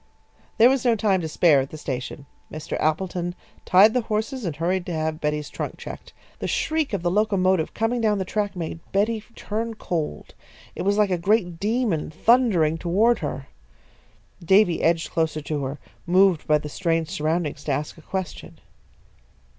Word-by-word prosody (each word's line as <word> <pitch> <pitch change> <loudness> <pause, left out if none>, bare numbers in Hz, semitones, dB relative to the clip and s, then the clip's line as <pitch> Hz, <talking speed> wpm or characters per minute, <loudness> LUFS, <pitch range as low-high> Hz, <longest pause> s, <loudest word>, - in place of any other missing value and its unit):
There 230 - +7
was 265 -1 +2
no 240 -2 +3
time 200 -4 +1
to 160 - -3
spare 155 -2 +4
at 135 - -5
the 155 - -9
station. 135 0 -5 0.3
Mr. 155 0 -5
Appleton 175 +2 -1 0.3
tied 200 +4 +6
the 250 - +2
horses 220 +3 -3
and 165 -4 -3
hurried 175 +4 0
to 175 - -3
have 155 0 -2
Betty's 150 -1 -1
trunk - - -5
checked. - - -9 0.3
The - - -3
shriek 315 -2 0
of 195 -5 -2
the 175 - +1
locomotive 190 -4 +1
coming 230 +2 0
down 215 -2 +2
the 190 - -2
track 205 0 -2
made 165 -2 -5
Betty 215 +2 +1
turn 225 +2 -4
cold. 160 - -4 0.4
It - - -6
was 200 +2 +1
like 210 -2 +3
a 180 - 0
great 180 -2 +1
demon 215 -6 0
thundering 175 -4 +3
toward 215 +8 +2
her. 140 -3 -4 1.0
Davy 190 0 +4
edged 165 0 +1
closer 160 -2 0
to 145 -1 -3
her, 135 +3 -4 0.3
moved 185 -2 +3
by 150 - +5
the 150 - -6
strange 165 0 -1
surroundings 155 -3 -1
to 150 - -1
ask 145 +2 -2
a 160 - -15
question. 190 0 -6
180 Hz, 175 wpm, -24 LUFS, 155-210 Hz, 1.0 s, There